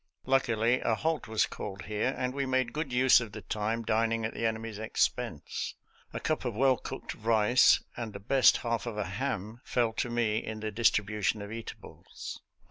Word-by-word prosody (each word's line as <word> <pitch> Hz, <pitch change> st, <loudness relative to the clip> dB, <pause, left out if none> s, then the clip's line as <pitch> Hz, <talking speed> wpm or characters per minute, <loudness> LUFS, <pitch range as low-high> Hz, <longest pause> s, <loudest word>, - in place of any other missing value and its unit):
Luckily, 125 Hz, -2 st, +2 dB
a 115 Hz, -, +1 dB
halt 160 Hz, +2 st, -1 dB
was 110 Hz, 0 st, +2 dB
called 95 Hz, -3 st, -7 dB
here, 110 Hz, +6 st, -1 dB
and 125 Hz, 0 st, -1 dB
we 140 Hz, -1 st, -2 dB
made 130 Hz, -2 st, +1 dB
good 150 Hz, -3 st, -3 dB
use 125 Hz, 0 st, +6 dB
of 110 Hz, -3 st, -7 dB
the 110 Hz, -, -8 dB
time 110 Hz, +2 st, -2 dB
dining 115 Hz, 0 st, +1 dB
at 110 Hz, -, -3 dB
the 115 Hz, -, 0 dB
enemy's 110 Hz, -1 st, -4 dB
expense. 110 Hz, -5 st, -2 dB, 0.4 s
A -, -, -4 dB
cup 155 Hz, -, -1 dB
of 120 Hz, -4 st, -3 dB
well 130 Hz, +2 st, +4 dB
cooked -, -, -6 dB
rice 115 Hz, +2 st, +4 dB
and 115 Hz, -2 st, -5 dB
the 100 Hz, -, -8 dB
best 130 Hz, +6 st, +5 dB
half 115 Hz, 0 st, -1 dB
of 110 Hz, -3 st, -4 dB
a 105 Hz, -, -1 dB
ham 110 Hz, +1 st, -4 dB
fell 120 Hz, -3 st, 0 dB
to 120 Hz, -, -2 dB
me 115 Hz, -2 st, +1 dB
in 110 Hz, 0 st, -5 dB
the 110 Hz, 0 st, -3 dB
distribution 105 Hz, -1 st, +1 dB
of 100 Hz, -, -8 dB
eatables. 115 Hz, 0 st, -8 dB
115 Hz, 190 wpm, -30 LUFS, 110-125 Hz, 0.4 s, use